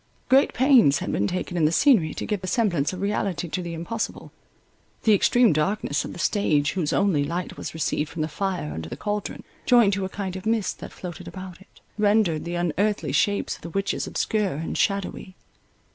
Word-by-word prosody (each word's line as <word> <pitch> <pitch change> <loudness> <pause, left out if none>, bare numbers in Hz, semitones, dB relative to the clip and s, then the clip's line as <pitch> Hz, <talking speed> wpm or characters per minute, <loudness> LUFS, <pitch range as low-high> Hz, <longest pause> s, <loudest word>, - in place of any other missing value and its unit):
Great 270 +2 +4
pains 250 - +5
had - - -3
been 100 - +1
taken 180 0 -3
in 165 -3 +2
the 155 - +3
scenery 180 - +4
to - - -5
give 210 -3 -2
the 185 - -5
semblance 180 - +1
of 185 0 -6
reality 200 -3 -1
to 180 +3 -3
the 170 -1 -5
impossible. 195 +8 -4 0.7
The 220 - +5
extreme 235 +1 +4
darkness 155 -1 0
of - - -6
the - - -9
stage, 160 -6 +1
whose 175 -6 -1
only 180 -8 +2
light 170 +5 -4
was - - -7
received 150 -1 -1
from 155 - -3
the - - -1
fire 180 - -3
under 80 +1 -6
the - - -6
cauldron, 210 -1 -4 0.2
joined 235 -5 +5
to 195 0 -1
a - - -4
kind 190 -2 -5
of 190 +3 -6
mist 225 -3 0
that - - -8
floated 175 -2 -8
about 185 -1 -9
it, - - -21 0.2
rendered 205 -7 +2
the 175 +1 -3
unearthly 175 -1 0
shapes 200 +8 +1
of - - -23
the 170 - -7
witches 195 +3 -2
obscure 210 -3 0
and 160 +3 -4
shadowy. 195 -2 -1
185 Hz, 205 wpm, -24 LUFS, 160-205 Hz, 0.7 s, pains